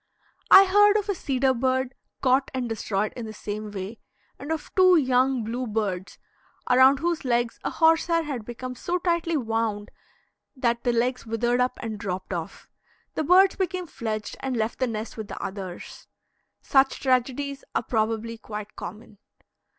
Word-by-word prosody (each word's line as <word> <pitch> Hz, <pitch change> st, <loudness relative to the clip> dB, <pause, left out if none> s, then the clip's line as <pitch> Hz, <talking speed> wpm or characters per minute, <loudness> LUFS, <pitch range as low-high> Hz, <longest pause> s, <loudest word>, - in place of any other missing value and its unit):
I 390 Hz, -, +10 dB
heard 415 Hz, +2 st, +5 dB
of 415 Hz, -1 st, -3 dB
a -, -, +2 dB
cedar 270 Hz, -6 st, +1 dB
bird 260 Hz, +1 st, 0 dB, 0.3 s
caught 260 Hz, +1 st, +3 dB
and 255 Hz, -2 st, -1 dB
destroyed 215 Hz, -2 st, -2 dB
in 235 Hz, -3 st, -6 dB
the 215 Hz, -, -7 dB
same 210 Hz, 0 st, -5 dB
way, 205 Hz, +2 st, -6 dB, 0.4 s
and 285 Hz, +4 st, -6 dB
of 315 Hz, -2 st, -4 dB
two 370 Hz, -1 st, +6 dB
young 260 Hz, -4 st, +2 dB
bluebirds, 215 Hz, -5 st, -3 dB, 0.5 s
around 260 Hz, +2 st, +6 dB
whose 335 Hz, +2 st, -1 dB
legs 240 Hz, -2 st, 0 dB
a -, -, -1 dB
horse 325 Hz, 0 st, +3 dB
hair 335 Hz, -1 st, +2 dB
had 275 Hz, -7 st, -4 dB
become 240 Hz, +3 st, -6 dB
so 345 Hz, +8 st, -2 dB
tightly 340 Hz, -2 st, 0 dB
wound 225 Hz, -4 st, -2 dB, 0.6 s
that 235 Hz, -2 st, 0 dB
the 245 Hz, -, +2 dB
legs 245 Hz, +1 st, -1 dB
withered 240 Hz, +2 st, +1 dB
up 250 Hz, 0 st, 0 dB
and 220 Hz, -3 st, -4 dB
dropped 190 Hz, -2 st, -4 dB
off. 170 Hz, -2 st, -6 dB, 0.5 s
The -, -, -1 dB
birds 370 Hz, +5 st, +5 dB
became 370 Hz, -1 st, -2 dB
fledged, 215 Hz, -8 st, -5 dB
and 260 Hz, -2 st, -3 dB
left 220 Hz, +1 st, -2 dB
the 255 Hz, -, +1 dB
nest 220 Hz, 0 st, -5 dB
with 220 Hz, -2 st, -5 dB
the -, -, -7 dB
others. 190 Hz, -2 st, -7 dB, 0.6 s
Such 270 Hz, -1 st, +3 dB
tragedies 270 Hz, +2 st, 0 dB
are -, -, +1 dB
probably 225 Hz, 0 st, -1 dB
quite 210 Hz, -1 st, -8 dB
common. 205 Hz, +2 st, -9 dB
250 Hz, 165 wpm, -25 LUFS, 220-280 Hz, 0.6 s, I